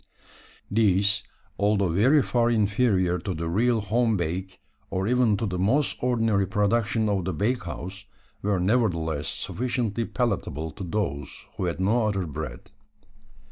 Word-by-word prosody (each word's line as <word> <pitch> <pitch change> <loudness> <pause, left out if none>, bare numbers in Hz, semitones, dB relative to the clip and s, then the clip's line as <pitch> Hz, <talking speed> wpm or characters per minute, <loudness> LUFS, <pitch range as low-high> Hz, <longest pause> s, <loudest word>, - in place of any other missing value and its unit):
These, 100 -2 +3 0.4
although 100 -2 +2
very 130 - +4
far 120 -1 +1
inferior 105 -5 +2
to 95 +1 -4
the 80 +1 -3
real 115 +6 +2
home 110 +2 +1
bake, 90 +3 -3 0.3
or 95 0 -1
even 120 -3 +3
to 115 - -2
the 90 -3 -3
most 125 +10 +2
ordinary 115 -6 +1
production 110 +3 +1
of 100 -3 0
the 95 - -1
bakehouse, 100 -2 -3 0.4
were 100 -2 +1
nevertheless 85 -8 +1
sufficiently 120 -2 -2
palatable 100 - -2
to 95 - -8
those 85 -6 -3
who 95 - -2
had 85 0 -2
no 110 +4 +2
other 100 -3 -1
bread. 75 -5 -7
100 Hz, 140 wpm, -26 LUFS, 90-115 Hz, 0.4 s, very